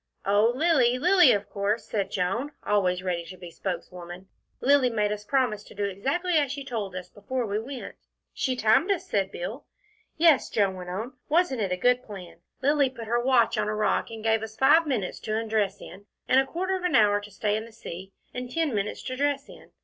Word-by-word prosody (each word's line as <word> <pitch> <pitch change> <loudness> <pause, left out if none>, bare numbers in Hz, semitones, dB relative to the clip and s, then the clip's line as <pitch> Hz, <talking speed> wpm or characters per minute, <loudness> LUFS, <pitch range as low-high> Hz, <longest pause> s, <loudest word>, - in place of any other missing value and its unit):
"Oh, 205 +4 +4
Lilly. 260 -5 +3
Lilly, 355 0 +6
of 205 -2 0
course," 205 +2 -1
said 200 -3 -2
Joan, 205 +10 -2
always 185 -3 +1
ready 175 -2 -1
to 185 +2 -10
be 175 -1 -10
spokeswoman. 180 0 -6 0.3
"Lilly 275 -1 +4
made 210 -3 0
us 210 0 -4
promise 240 -4 0
to - - -14
do 205 - -2
exactly 275 - -1
as 285 -3 0
she 280 -1 -6
told 210 -7 -4
us 185 -1 -6
before 240 +4 -4
we 210 0 -1
went." 255 +3 -7 0.4
"She 260 -2 -1
timed 225 - +3
us," 390 - -1
said 195 -1 0
Bill. 215 +10 -6 0.5
"Yes," 320 -4 +4
Joan 200 -3 +1
went 180 -1 -8
on, 220 +9 -4 0.2
"wasn't 310 -6 +2
it 195 -3 -1
a 180 - 0
good 250 +6 +3
plan? 190 -8 -10 0.3
Lilly 285 -1 +3
put 235 -3 -9
her 235 +2 +1
watch 240 -3 +3
on 210 - 0
a 215 - -1
rock 215 - 0
and 225 -1 -8
gave 225 -1 +2
us 220 0 -8
five 305 +5 +5
minutes 225 -10 -2
to 215 0 -2
undress 215 -3 -1
in, 200 +2 -12 0.2
and 260 - +5
a 270 - +1
quarter 375 +5 -2
of 370 - -5
an 360 -2 +1
hour 205 -1 +4
to 205 - -11
stay 205 +1 -1
in 220 +1 -3
the 230 - -14
sea, 190 -4 -9 0.2
and 250 0 -5
ten 320 -2 0
minutes 205 0 -2
to 255 - -4
dress 285 0 -1
in. - - -14
220 Hz, 220 wpm, -26 LUFS, 200-265 Hz, 0.5 s, Lilly